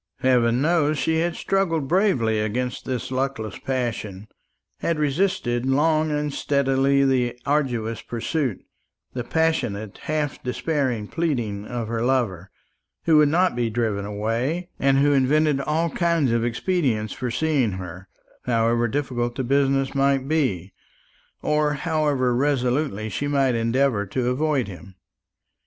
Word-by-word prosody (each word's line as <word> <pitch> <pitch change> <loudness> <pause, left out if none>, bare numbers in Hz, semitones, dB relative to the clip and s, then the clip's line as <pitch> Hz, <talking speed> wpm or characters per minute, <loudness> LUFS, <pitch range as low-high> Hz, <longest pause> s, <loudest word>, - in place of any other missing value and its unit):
Heaven 125 0 +3
knows 155 -2 +2
she 160 +2 +1
had 170 +1 0
struggled 165 -7 0
bravely 135 - +2
against 120 +4 -2
this 130 -1 -3
luckless 130 -6 -2
passion, 115 -6 -3 0.5
had 170 - 0
resisted 150 -5 0
long 155 +4 +2
and 150 -1 -1
steadily 140 0 +2
the 125 -2 +1
assiduous 125 -6 0
pursuit, 120 - -3 0.5
the 125 - -3
passionate 120 -10 -1
half 150 -2 -2
despairing 125 -3 -1
pleading, 120 -12 -2
of 120 -2 -4
her 115 0 -2
lover, 115 -8 0 0.5
who 160 -2 +4
would 150 -1 +5
not 180 -1 +2
be 120 -1 0
driven 110 -3 -1
away, 115 - -2
and 135 0 +3
who 145 +1 +4
invented 140 +1 +2
all 160 +3 0
kinds 170 -7 +1
of 115 0 +1
expedients 120 - 0
for 125 - -4
seeing 125 -3 +1
her, 90 0 -8 0.4
however 115 0 +2
difficult 120 -2 -2
the 130 - -2
business 135 +1 +1
might 135 -1 +1
be, 120 - 0 0.7
or 150 -1 +2
however 145 -5 0
resolutely 130 -4 0
she 125 +7 -3
might 135 -3 +2
endeavour 115 -2 +1
to 125 +5 -1
avoid 140 -2 0
him. 95 0 -11
130 Hz, 135 wpm, -23 LUFS, 115-150 Hz, 0.7 s, would